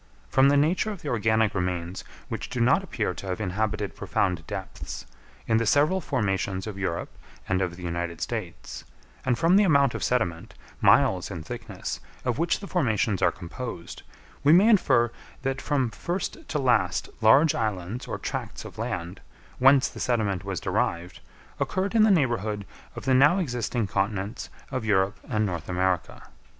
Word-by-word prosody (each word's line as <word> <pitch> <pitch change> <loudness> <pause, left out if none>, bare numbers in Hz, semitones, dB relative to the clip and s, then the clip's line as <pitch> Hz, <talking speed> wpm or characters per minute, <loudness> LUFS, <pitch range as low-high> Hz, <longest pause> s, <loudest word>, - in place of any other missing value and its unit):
From 135 +1 +5
the 145 - +4
nature 165 +8 +2
of 205 -5 -7
the 150 - -3
organic 110 -1 +2
remains 90 -1 -2 0.2
which - - -5
do 125 - -4
not 130 +10 +4
appear 110 - -2
to 95 - -8
have 90 +1 -2
inhabited 105 +1 -2
profound 90 -4 -1
depths, - - -6 0.4
in 110 - +2
the 115 - +1
several 155 - +3
formations 95 - -1
of 110 -3 -5
Europe 85 -3 -3 0.3
and 95 0 +1
of 90 -2 -1
the 90 - -11
United 85 -1 -3
States; - - -5 0.4
and 125 -2 +1
from 170 +5 +4
the 210 - +6
amount 140 -8 +4
of - - -4
sediment, 100 -10 -1 0.3
miles - - +4
in 80 - -6
thickness, - - -6 0.3
of 125 -2 0
which 170 +3 +1
the 200 - -7
formations 110 - +1
are - - +4
composed, 95 +1 -7 0.4
we 145 - +6
may 190 +7 +7
infer 130 - +4 0.3
that 135 0 -1
from 135 -5 0
first 190 - -4
to 150 - -1
last 115 - +2
large 140 +8 +6
islands 105 +1 -3
or - - -3
tracts - - -5
of - - -10
land, 90 +2 -4 0.4
whence 135 0 +6
the - - -10
sediment 105 -7 0
was 100 -4 -3
derived, 85 +1 -2 0.4
occurred 190 +2 -1
in 225 - +5
the 215 - +6
neighbourhood 115 - +1 0.3
of - - -7
the 135 - +3
now 145 +7 +6
existing 120 - -1
continents 100 +2 -2 0.2
of 130 - -2
Europe 100 -2 +1
and 110 -3 +1
North 85 -5 -4
America. 90 -1 -1
110 Hz, 170 wpm, -26 LUFS, 95-140 Hz, 0.4 s, may